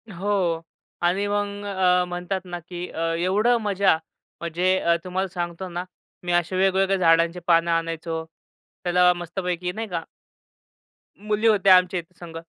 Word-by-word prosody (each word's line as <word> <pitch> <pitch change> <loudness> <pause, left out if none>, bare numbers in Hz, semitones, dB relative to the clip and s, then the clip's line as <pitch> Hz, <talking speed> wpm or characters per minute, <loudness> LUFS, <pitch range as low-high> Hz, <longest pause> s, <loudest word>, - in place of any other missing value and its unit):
हो 180 -3 0 0.4
आणि 185 +4 +2
मग 205 0 -2
अ, 185 -2 +2
म्हणतात 180 +2 -3
ना, 175 -1 -6
की 175 +1 -7
अ, - - -8 0.2
एवढं 205 +8 +2
मजा 200 -5 +2 0.4
म्हणजे 175 +3 +1
अ, 170 0 +2
तुम्हाला 185 +1 -2
सांगतो 175 0 -5
ना, 175 0 -4 0.4
मी 175 - -2
असे 175 +1 +1
वेगवेगळ्या 195 +1 +2
झाडांची 170 0 +3
पानं 170 0 +4
आणायचो. 165 0 -2 0.6
त्याला 180 0 +4
मस्तपैकी 180 0 -3
नाही 220 +4 -5
का 170 -4 -3 1.2
मुली 215 +1 +2
होत्या 200 -3 +6
आमच्या 180 0 0
इथे 170 +1 -14
संग. 165 -2 -9
180 Hz, 145 wpm, -24 LUFS, 170-195 Hz, 1.2 s, होत्या